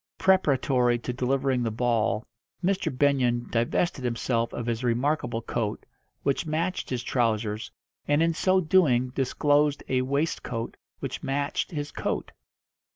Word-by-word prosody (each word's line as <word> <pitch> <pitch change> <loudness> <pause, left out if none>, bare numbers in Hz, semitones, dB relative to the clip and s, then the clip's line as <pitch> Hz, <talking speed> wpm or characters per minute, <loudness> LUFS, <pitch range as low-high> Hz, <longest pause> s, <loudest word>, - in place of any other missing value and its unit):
Preparatory 135 -9 +3
to 125 +1 -4
delivering 130 +1 +1
the 115 - 0
ball 115 -1 0 0.4
Mr. 190 +1 +1
Benyon 125 -3 +2
divested 130 +5 0
himself 115 -1 0
of 120 - -4
his 115 0 -2
remarkable 120 -1 0
coat, 110 -3 -3 0.4
which 140 +2 +1
matched 165 +4 -1
his 125 -2 -2
trousers, 110 -3 0 0.4
and 145 +2 +3
in 165 0 +2
so 185 +3 +3
doing 155 -8 +3
disclosed 145 +2 +1
a 130 -1 +1
waistcoat 130 -4 -2 0.3
which - - -4
matched 140 +1 -1
his 145 -5 -4
coat. - - -3
130 Hz, 130 wpm, -27 LUFS, 120-145 Hz, 0.4 s, Preparatory